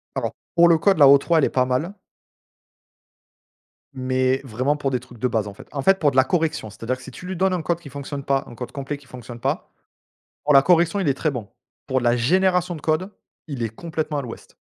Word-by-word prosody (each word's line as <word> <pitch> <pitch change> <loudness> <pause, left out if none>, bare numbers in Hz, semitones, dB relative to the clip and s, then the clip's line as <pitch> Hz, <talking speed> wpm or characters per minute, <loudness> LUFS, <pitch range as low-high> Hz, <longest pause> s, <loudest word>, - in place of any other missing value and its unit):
Alors - - -2 0.2
pour 170 0 +7
le 165 -1 +5
code, 195 0 +3
la 140 - +8
O3 140 +4 +5
elle 150 - +4
est - - +1
pas 130 - +2
mal. 130 +10 -1 2.0
Mais 130 0 0
vraiment 130 +5 -1
pour 140 -2 -2
des 125 -2 -1
trucs 120 -1 -15
de 125 - 0
base, 110 -3 -1
en 100 - -9
fait - - -13
en 140 -2 -3
fait, 195 +4 +4
pour 145 -3 +2
de - - -6
la 130 - +7
correction, 160 - -1
c'est-à-dire 115 +4 -4
que 130 - -15
si 130 - -10
tu 180 - -10
lui 185 - -4
donnes 190 +1 +2
un 180 -3 -1
code 170 +1 -1
qui 150 - -11
fonctionne 140 +1 -6
pas 135 0 0
un 120 - -11
code 125 +1 -7
complet 140 +1 -5
qui 140 -1 -19
fonctionne 120 -1 -10
pas, - - -2 0.8
pour 150 - +3
la 135 - +8
correction 170 +4 +3
il 185 - -1
est 140 - +3
très 150 +2 -1
bon. 115 -6 -6 0.4
Pour 130 0 +1
de - - -6
la 120 0 +3
génération 180 +6 +2
de 155 - -10
code, 160 +5 0 0.4
il 135 -5 -4
est 115 - -1
complètement 155 +3 -4
à - - -1
l'ouest. 120 -3 -10
140 Hz, 245 wpm, -22 LUFS, 125-165 Hz, 2.0 s, la